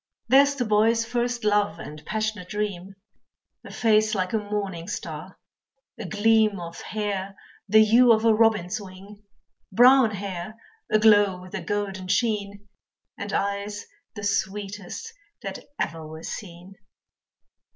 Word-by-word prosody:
There's 280 +3 +5
the 250 -3 -1
boy's 225 +2 +3
first 240 0 -2
love 205 -5 +1
and 150 -2 -9
passionate 215 -4 -3
dream, 200 -3 -4 0.7
A - - -11
face 215 -1 +2
like 185 0 -2
a 220 - +2
morning 200 -5 -4
star, 170 -2 -6 0.6
a 225 - -5
gleam 215 0 +2
Of 170 -1 -8
hair 200 -2 -4 0.3
the 220 +1 +6
hue 235 +3 +6
of 220 0 +3
a 225 - +6
robin's 215 -4 +2
wing 200 +2 -12 0.5
Brown 250 +3 +6
hair 200 -1 -6 0.4
aglow 205 -3 +5
with 185 +1 -13
a 200 - -3
golden 195 0 -3
sheen, 205 0 -1 0.5
And 200 0 -6
eyes 200 +1 -2 0.3
the 205 - -7
sweetest 200 - -3 0.3
that - - -5 0.2
ever 160 -2 -3
were 160 +1 -10
seen. 180 0 -8
205 Hz, 130 wpm, -25 LUFS, 190-220 Hz, 0.7 s, the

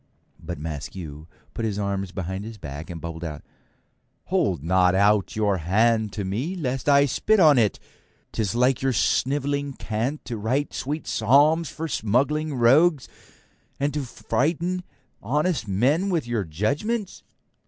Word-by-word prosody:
But 85 0 -5
Maskew 75 0 -7 0.3
puts 115 - -2
his 100 -2 -3
arms 100 -2 -2
behind 95 +1 -4
his 110 0 -8
back 75 -3 -8
and 85 -2 -6
bubbles 80 0 -6
out, 75 -3 -6 0.8
'Hold - - 0
not 90 +1 +3
out 100 +1 +3
your 105 -3 +1
hand 110 +5 +2
to 100 -3 -3
me 125 - -2
lest 135 -5 -2
I 140 0 +6
spit 215 - +2
on 150 -7 +6
it. 105 -3 +1 0.5
'Tis 105 -1 -2
like 125 +1 +2
your 135 -1 +1
snivelling 140 +3 0
cant 120 +6 -3
to 120 - -4
write 130 +7 -1
sweet 150 +4 -4
psalms 145 +8 +3
for 165 +1 -5
smuggling 140 +5 0
rogues 135 +5 +4 0.7
and 140 +1 0
try 150 - -1
to 135 - -6
frighten 170 +9 -1 0.4
honest 150 - 0
men 135 - +2
with 165 -8 0
your 115 -5 -1
judgements.' 145 - -2
120 Hz, 150 wpm, -24 LUFS, 100-145 Hz, 0.8 s, I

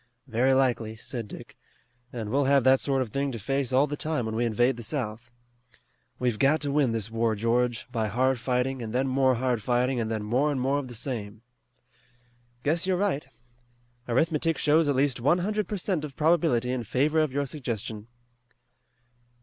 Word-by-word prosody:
"Very 130 +1 +2
likely," 120 -4 +1
said 115 0 -6
Dick, - - -11 0.6
"and 110 -3 -5
we'll 140 +2 +2
have 140 -1 +4
that 130 +1 +5
sort 135 -2 +1
of 120 - -9
thing 140 +2 -1
to - - -4
face 135 +4 -1
all 130 +3 +4
the 145 0 -4
time 150 -5 -2
when 110 - -3
we 120 +1 +1
invade 120 +3 +2
the 120 - -8
South. 120 -2 -4 0.9
We've 120 -4 -1
got 145 +3 +4
to 145 -1 0
win 140 -4 +2
this 115 -1 -2
war, 115 -1 +1
George, 120 +2 0
by 110 -3 -1
hard 130 +4 +1
fighting, 125 +1 -1
and 110 -1 -5
then 130 +2 +1
more 130 0 +3
hard 120 -1 0
fighting, 125 +3 +1
and 110 -1 -2
then 110 -2 -2
more 130 +8 +1
and 140 - -2
more 135 +3 +1
of 140 - -6
the 120 - -8
same." 110 -3 -5 1.2
"Guess 165 +5 +1
you're 185 -1 +2
right. 180 -8 -1 0.8
Arithmetic 160 +5 +1
shows 155 +1 +3
at 145 - +1
least 135 -1 +1
one 140 +8 +3
hundred 210 +2 -1
per 210 - -3
cent 180 -4 -1
of 145 -3 -7
probability 150 -7 +2
in 130 -2 -2
favor 145 +8 +1
of 155 -3 +1
your 140 +2 -1
suggestion." 115 -6 -5
130 Hz, 190 wpm, -27 LUFS, 115-145 Hz, 1.2 s, that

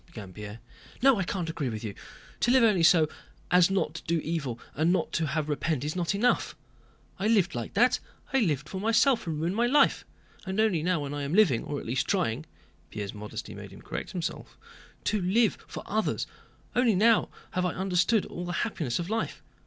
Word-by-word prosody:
began 100 -5 -10
Pierre. 105 +1 -8 0.5
"No, 270 -5 +6
I - - +1
can't 175 -1 -3
agree 160 -5 -2
with 110 -1 -5
you! 105 -2 -4 0.5
To - - +2
live 255 0 +5
only 210 -6 +4
so 165 -1 +6 0.4
as 180 0 +6
not 195 -5 0
to 165 - -8
do 170 0 +2
evil 145 -8 -3
and 160 +4 +2
not 185 - 0
to 165 -2 0
have 155 +2 -1
to 150 - -3
repent 145 -2 -1
is 150 +3 -3
not 180 +1 0
enough. 245 +5 +1 0.6
I 200 - 0
lived 200 -6 +3
like 120 -2 -5
that, 245 +5 +4 0.3
I 270 - +4
lived 150 - 0
for 190 +4 -5
myself 230 +1 +3
and 155 -2 -2
ruined 170 +4 -1
my 235 +2 +2
life. 280 +3 +4 0.4
And 190 +1 -3
only 215 -7 +3
now 175 -1 +1
when 140 0 -4
I 145 - -3
am 140 +4 -2
living, 185 - +4
or 145 - -4
at - - -9
least 125 +3 -1
trying" 155 - 0 0.4
(Pierre's 100 -2 -5
modesty 105 0 -7
made - - -9
him - - -14
correct - - -5
himself) 175 -3 -5 0.5
"to 210 -2 0
live 210 +5 +2
for - - -7
others, 215 +1 -1 0.5
only 245 -4 +4
now 225 +4 +4 0.2
have 180 - -1
I 180 - -3
understood 190 +3 +2
all 175 - -6
the 175 - -3
happiness 155 - -2
of 175 - -3
life. 220 +2 -3
175 Hz, 210 wpm, -28 LUFS, 150-210 Hz, 0.6 s, No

